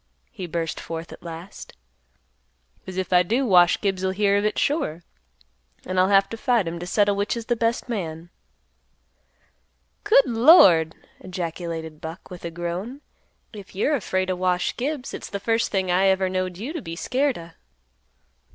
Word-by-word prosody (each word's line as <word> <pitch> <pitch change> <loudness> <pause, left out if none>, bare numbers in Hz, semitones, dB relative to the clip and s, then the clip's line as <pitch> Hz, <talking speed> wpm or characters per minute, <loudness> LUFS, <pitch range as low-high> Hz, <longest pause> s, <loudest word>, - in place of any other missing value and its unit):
he 180 - -7
burst 165 -1 -3
forth 165 0 -7
at - - -13
last. 170 +2 -9 1.1
"'Cause 185 0 -8
if 190 0 -2
I 180 - +7
do 235 +10 0
Wash 180 -5 +5
Gibbs'll 190 -2 0
hear 200 0 +2
of 205 - +1
it 210 - 0
sure, 280 - -1 0.8
and 185 0 -1
I'll 185 - +4
have 195 -1 +5
to 225 - -6
fight 235 -6 +1
him 170 +1 -4
to 175 - -6
settle 205 +1 +2
which 205 +3 -1
is 230 - -6
th' 240 -1 -1
best 230 +2 0
man." 170 -7 -5 1.7
"Good 275 - +5
Lord!" 225 - +6 0.2
ejaculated 165 -3 -5
Buck, 165 +4 -9
with 180 - -9
a 170 - -3
groan. 175 - -5 0.5
"If 200 -3 -11
you're 245 +10 +1
afraid 185 -6 -1
o' - - -1
Wash 180 0 0
Gibbs, 275 +1 -3
it's - - -7
th' 200 - -4
first 225 +3 0
thing 190 -2 0
I 190 +2 +3
ever 190 -1 +2
knowed 185 -1 -2
you 245 - -5
t' 335 - -3
be 165 - -7
scared 265 +8 0
o'." 170 0 -10
185 Hz, 170 wpm, -24 LUFS, 175-225 Hz, 1.7 s, I